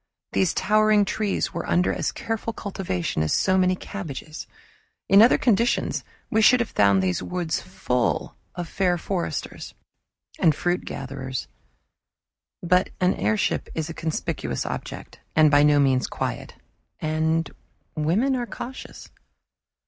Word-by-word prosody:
These 190 Hz, -3 st, +1 dB
towering 215 Hz, 0 st, +3 dB
trees 205 Hz, 0 st, -1 dB
were 170 Hz, -, -4 dB
under 180 Hz, +1 st, +2 dB
as -, -, -1 dB
careful 225 Hz, 0 st, -4 dB
cultivation 175 Hz, -, -3 dB
as 80 Hz, -, 0 dB
so 185 Hz, -, +2 dB
many 185 Hz, 0 st, +3 dB
cabbages. 160 Hz, -5 st, -7 dB, 0.6 s
In 200 Hz, +1 st, +7 dB
other 230 Hz, -, +6 dB
conditions 235 Hz, 0 st, +1 dB, 0.3 s
we 220 Hz, -2 st, +3 dB
should 250 Hz, +3 st, +6 dB
have 235 Hz, -, -2 dB
found 100 Hz, -2 st, +3 dB
those 90 Hz, -2 st, 0 dB
woods 175 Hz, -3 st, -2 dB
full 125 Hz, -9 st, -1 dB, 0.2 s
of 175 Hz, -1 st, -4 dB
fair 180 Hz, 0 st, +1 dB
foresters 175 Hz, +1 st, -4 dB, 0.6 s
and 160 Hz, -5 st, +4 dB
fruit 175 Hz, +2 st, -1 dB
gatherers; 130 Hz, -1 st, -5 dB, 1.2 s
but 180 Hz, +1 st, +3 dB
an 180 Hz, 0 st, +3 dB
airship 215 Hz, -1 st, 0 dB
is 160 Hz, 0 st, -3 dB
a -, -, -6 dB
conspicuous 155 Hz, -, -3 dB
object, -, -, -6 dB, 0.2 s
and 155 Hz, -1 st, +6 dB
by 145 Hz, 0 st, +6 dB
no 145 Hz, 0 st, +5 dB
means 130 Hz, -3 st, +2 dB
quiet -, -, -4 dB, 0.4 s
and 160 Hz, +1 st, 0 dB, 0.4 s
women 190 Hz, -, +1 dB
are 245 Hz, -2 st, -2 dB
cautious. 260 Hz, +3 st, -8 dB
175 Hz, 135 wpm, -24 LUFS, 150-205 Hz, 1.2 s, In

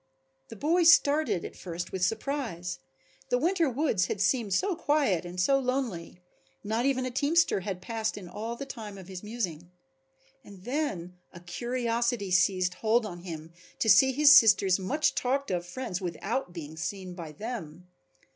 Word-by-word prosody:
The -, -, -10 dB
boy 325 Hz, -, +1 dB
started, 310 Hz, -, +4 dB
at -, -, -8 dB
first 175 Hz, -1 st, -6 dB
with 185 Hz, -1 st, -3 dB
surprise. 200 Hz, -, -2 dB, 0.5 s
The 245 Hz, -, +2 dB
winter 335 Hz, +2 st, +1 dB
woods 240 Hz, -, +1 dB
had 200 Hz, -, -3 dB
seemed 205 Hz, +2 st, +1 dB
so 375 Hz, -, +1 dB
quiet 290 Hz, -, +1 dB
and 175 Hz, +1 st, -7 dB
so 275 Hz, +10 st, +3 dB
lonely, 245 Hz, -10 st, -3 dB, 0.4 s
not 225 Hz, +5 st, 0 dB
even 260 Hz, -2 st, 0 dB
a 255 Hz, -, -3 dB
teamster 290 Hz, 0 st, +2 dB
had 185 Hz, -1 st, -5 dB
passed 220 Hz, 0 st, -3 dB
in 190 Hz, -3 st, -8 dB
all 225 Hz, +6 st, -5 dB
the 275 Hz, -, -6 dB
time 220 Hz, -7 st, -8 dB
of 190 Hz, -2 st, -11 dB
his 185 Hz, -2 st, -7 dB
musing. 185 Hz, -7 st, -5 dB, 0.7 s
And 200 Hz, -4 st, -14 dB
then 200 Hz, -, -3 dB
a 170 Hz, -, -11 dB
curiosity 235 Hz, +2 st, -2 dB
seized 185 Hz, 0 st, +2 dB
hold 220 Hz, +5 st, +1 dB
on 175 Hz, -4 st, -7 dB
him 165 Hz, -2 st, -8 dB, 0.2 s
to -, -, -1 dB
see 265 Hz, +7 st, +7 dB
his 290 Hz, +2 st, +7 dB
sister's 200 Hz, -6 st, +6 dB
much 285 Hz, +12 st, 0 dB
talked 270 Hz, -1 st, -1 dB
of 175 Hz, -1 st, -2 dB
friends 190 Hz, -1 st, -5 dB
without 195 Hz, +6 st, -3 dB
being 160 Hz, -2 st, -8 dB
seen 185 Hz, +2 st, -5 dB
by 170 Hz, -4 st, -8 dB
them. 180 Hz, -3 st, -7 dB
210 Hz, 165 wpm, -28 LUFS, 180-260 Hz, 0.7 s, see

